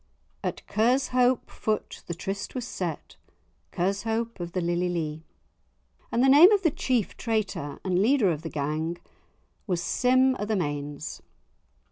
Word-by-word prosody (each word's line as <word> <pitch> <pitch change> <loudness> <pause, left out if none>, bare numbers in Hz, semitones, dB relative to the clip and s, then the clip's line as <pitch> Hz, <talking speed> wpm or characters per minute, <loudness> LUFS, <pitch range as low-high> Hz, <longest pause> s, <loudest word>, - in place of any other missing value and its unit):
"At - - -4
Kershope 250 +2 +2
foot 215 -1 -3
the 170 - -4
tryst 195 +6 -5
was 250 -2 -3
set, 170 -5 -5 0.5
Kershope 220 +5 -1
of 175 0 -5
the 185 - 0
lily 175 +1 0
lee," 160 -2 -3 0.9
and 235 - +2
the - - +5
name 300 +9 +9
of 405 -2 +3
the 325 - +3
chief 250 -6 -1
traitor 215 - -2
and 185 -1 +2
leader 225 -4 +4
of 155 -2 -3
the 165 - -5
gang 155 +3 -2 0.7
was 180 -3 0
Sim 255 +5 +3
o' 205 - -1
the 215 0 0
Mains. 145 -3 -4
195 Hz, 145 wpm, -27 LUFS, 170-245 Hz, 0.9 s, name